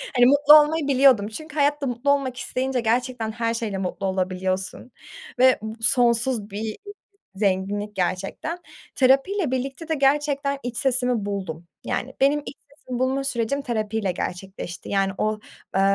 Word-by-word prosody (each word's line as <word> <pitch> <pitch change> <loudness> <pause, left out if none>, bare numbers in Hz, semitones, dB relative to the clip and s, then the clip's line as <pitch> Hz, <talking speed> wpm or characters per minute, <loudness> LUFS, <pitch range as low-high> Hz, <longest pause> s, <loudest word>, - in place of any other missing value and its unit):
Hani, 245 - +6
mutlu 285 +3 +6
olmayı 300 0 -1
biliyordum. 260 -6 +5
Çünkü 310 +7 -9
hayatta 290 -1 +1
mutlu 245 +4 0
olmak 265 -3 0
isteyince 255 0 -2
gerçekten 235 0 -1
her 230 0 -1
şeyle 220 -4 -3
mutlu 190 +1 -3
olabiliyorsun 190 +4 -2 0.5
ve 255 -2 +5
bu 220 0 -6
sonsuz 235 -3 +2
bir 215 +2 -4 0.6
zenginlik 205 +1 -1
gerçekten. 195 - -2 0.4
Terapiyle 275 +5 +2
birlikte 270 +5 -3
de 320 - 0
gerçekten 280 0 +1
iç 240 -1 -5
sesimi 250 -5 +1
buldum. 180 -5 -5 0.2
Yani 265 - -3
benim 285 +2 +4
iç - - -8 0.2
sesimi 250 -1 -6
bulma 265 +1 0
sürecim 270 +2 -1
terapiyle 220 -5 -2
gerçekleşti. 180 0 -6
Yani 195 -1 +1
o, 215 0 -1 0.4
eee, 195 - +3
245 Hz, 145 wpm, -23 LUFS, 205-275 Hz, 0.6 s, Hani